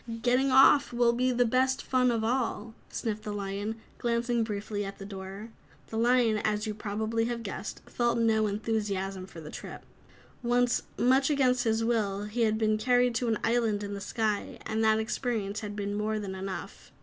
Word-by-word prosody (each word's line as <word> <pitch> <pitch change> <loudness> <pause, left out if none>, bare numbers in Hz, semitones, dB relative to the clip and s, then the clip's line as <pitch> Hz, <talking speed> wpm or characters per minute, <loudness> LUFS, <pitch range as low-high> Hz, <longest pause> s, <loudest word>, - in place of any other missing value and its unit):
"Getting 250 +2 +3
off 270 +2 +6
will 240 -1 +3
be 255 +2 +1
the 245 0 +3
best 260 +3 +1
fun 255 -1 +2
of 230 -2 0
all," 230 -2 -1 0.2
sniffed 215 -2 -3
the 210 - -5
lion, 205 +2 -4 0.2
glancing 235 0 +1
briefly 210 -1 -3
at 195 0 -6
the 195 - -8
door. 195 +2 -8 0.4
The 220 - -4
Lion, 235 -2 +3
as 210 0 0
you 215 - -2
probably 220 +2 -2
have 235 -1 -3
guessed, 200 -1 -6
felt 240 -1 0
no 220 -2 +3
enthusiasm 200 -3 -2
for 165 - -11
the 150 - -9
trip. - - -8 0.6
Once, 245 0 +2 0.2
much 265 +3 +3
against 255 -4 +2
his 225 0 +1
will, 210 -4 0
he 210 +3 -3
had 220 -1 +3
been 215 -1 +1
carried 245 +1 +3
to 235 +1 -1
an 225 -2 +1
island 225 -3 +1
in 205 0 -4
the 200 - -5
sky, 210 0 -2
and 220 0 -1
that 220 0 +4
experience 220 -2 -2
had 210 -1 -6
been 205 -1 -3
more 215 +1 -1
than 200 -2 -4
enough. 190 0 -7
220 Hz, 185 wpm, -29 LUFS, 205-240 Hz, 0.6 s, off